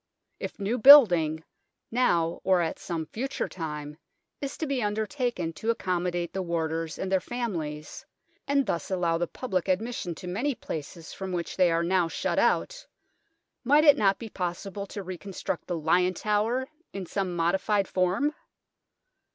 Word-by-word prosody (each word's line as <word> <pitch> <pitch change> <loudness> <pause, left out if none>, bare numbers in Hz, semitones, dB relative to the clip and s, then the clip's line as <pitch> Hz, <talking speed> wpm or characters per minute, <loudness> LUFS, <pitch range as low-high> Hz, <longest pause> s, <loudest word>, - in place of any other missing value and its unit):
If - - -6
new 215 +5 -1
building, 175 - +8 0.5
now 170 -9 +1
or 185 -2 +3
at 165 - -2
some 165 -2 -4
future 270 - -3
time, 150 -3 -6 0.4
is 275 -1 -4
to 320 - -2
be 275 -3 -1
undertaken 215 - -2
to 220 +8 -4
accommodate 175 -5 -1
the 190 - -2
warders 165 -2 -2
and 190 - -4
their 190 - +4
families, 170 -11 -5 0.4
and 280 -1 +2
thus 170 -5 -2
allow 175 -3 0
the 175 - 0
public 190 -6 -3
admission 190 -2 -1
to 180 - -9
many 240 +10 -1
places 160 -2 -7
from 190 -1 -5
which 170 -1 -3
they 180 -2 +4
are 165 0 +1
now 180 0 +2
shut 165 - -1
out, - - +1 0.8
might 290 +4 +5
it 290 -2 +8
not 195 -2 +3
be 230 - -7
possible 195 +2 -4
to 200 +1 -6
reconstruct 185 +1 -5
the 175 - -2
Lion 180 +4 +2
Tower 220 +5 0 0.3
in 195 -2 -5
some 185 0 -2
modified 190 +4 +1
form 185 +11 +1
185 Hz, 155 wpm, -27 LUFS, 170-225 Hz, 0.8 s, building